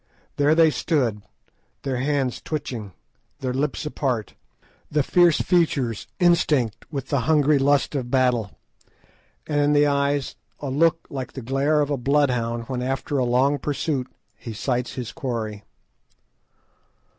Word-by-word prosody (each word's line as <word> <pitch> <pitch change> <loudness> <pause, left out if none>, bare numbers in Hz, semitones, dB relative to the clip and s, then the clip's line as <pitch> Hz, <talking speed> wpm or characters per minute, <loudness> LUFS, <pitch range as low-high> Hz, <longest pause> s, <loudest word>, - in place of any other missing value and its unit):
There 145 +2 +4
they 160 -1 +5
stood, 125 -11 0 0.6
the 130 -3 -2
hands 135 -2 -1
twitching, 120 - -5 0.4
the 130 -1 -3
lips 140 +3 -2
apart, 125 -8 -2 0.6
the 150 -1 +1
fierce 175 +1 +4
features 140 - +1
instinct 150 - +2
with 135 -3 -5
the 140 - +1
hungry 150 -2 +4
lust 140 +1 +2
of 130 -4 -3
battle, 125 -5 +1 0.9
and 145 -1 0
in 145 0 +3
the 145 0 +5
eyes 140 -1 0 0.2
a 140 -2 -4
look 165 +3 +2
like 130 -2 -5
the 130 - -7
glare 140 +5 +1
of 145 0 -1
a 140 - +1
bloodhound 125 -3 +1
when 125 +1 -4
after 135 +2 -1
long 130 +4 +2
pursuit 140 -1 -2 0.3
he 115 - -8
sights 125 +3 -2
his 125 -3 -5
quarry. 115 -8 -4
135 Hz, 135 wpm, -23 LUFS, 125-150 Hz, 0.9 s, they